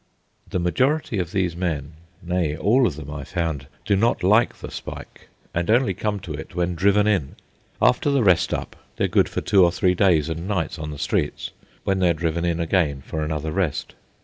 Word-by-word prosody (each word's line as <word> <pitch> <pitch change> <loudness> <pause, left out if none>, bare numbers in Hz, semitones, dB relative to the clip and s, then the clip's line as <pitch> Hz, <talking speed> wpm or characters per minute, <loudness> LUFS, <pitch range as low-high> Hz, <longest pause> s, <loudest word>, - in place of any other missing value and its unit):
The - - -1
majority 125 - +1
of 90 -2 -3
these 90 -4 0
men, 80 -5 -3 0.3
nay, 85 -4 -1
all 115 +10 +3
of 75 - -3
them, 75 -1 -8
I 70 -1 -5
found, 80 -4 -3 0.2
do 100 - +3
not 115 +2 +1
like 105 +6 +3
the - - -8
spike, - - -9 0.3
and 85 +2 -1
only 115 -3 +3
come 105 +2 -2
to 80 - -6
it 80 +3 -8
when 90 0 0
driven 100 +4 +3
in. 100 -10 0 0.4
After 125 +3 +3
the 140 -3 +2
"rest 90 -3 +3
up" - - -3 0.2
they - - +1
are - - +1
good - - +2
for - - -3
two 95 -2 +4
or 85 - +4
three 90 +1 +2
days 85 -5 +3
and 80 +2 -4
nights 90 -5 -2
on 75 -1 -5
the 75 - -6
streets, 75 +2 -2 0.3
when 95 -1 0
they 90 -2 +3
are - - +4
driven 85 +1 -1
in 85 -1 0
again 80 -5 0
for 80 - -4
another 75 0 -2
rest. 90 -4 -2
85 Hz, 210 wpm, -23 LUFS, 80-100 Hz, 0.4 s, two